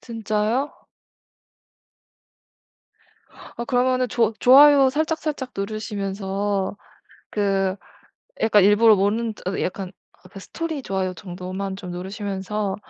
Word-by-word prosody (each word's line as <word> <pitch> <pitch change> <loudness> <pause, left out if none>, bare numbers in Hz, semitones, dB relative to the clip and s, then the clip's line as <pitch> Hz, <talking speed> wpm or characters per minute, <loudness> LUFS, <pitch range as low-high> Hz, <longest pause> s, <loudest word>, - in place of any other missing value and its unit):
진짜요? 225 +4 -2 2.7
어 235 - -4
그러면은 255 -1 +1
조 230 -2 +1
좋아요 275 +1 +7
살짝살짝 305 -3 -2
누르시면서 200 -1 -3 0.5
그 195 -2 0 0.7
약간 210 -3 +5
일부러 210 +1 +6
모르는 215 +3 0
어 190 - -2
약간 185 0 -3
아 185 - -19 0.4
그 195 - -9
스토리 320 - -5
좋아요 190 -3 -2
정도만 185 +1 -6
좀 180 -2 -8
누르시면서 195 +2 -4
205 Hz, 235 characters per minute, -22 LUFS, 195-245 Hz, 2.7 s, 좋아요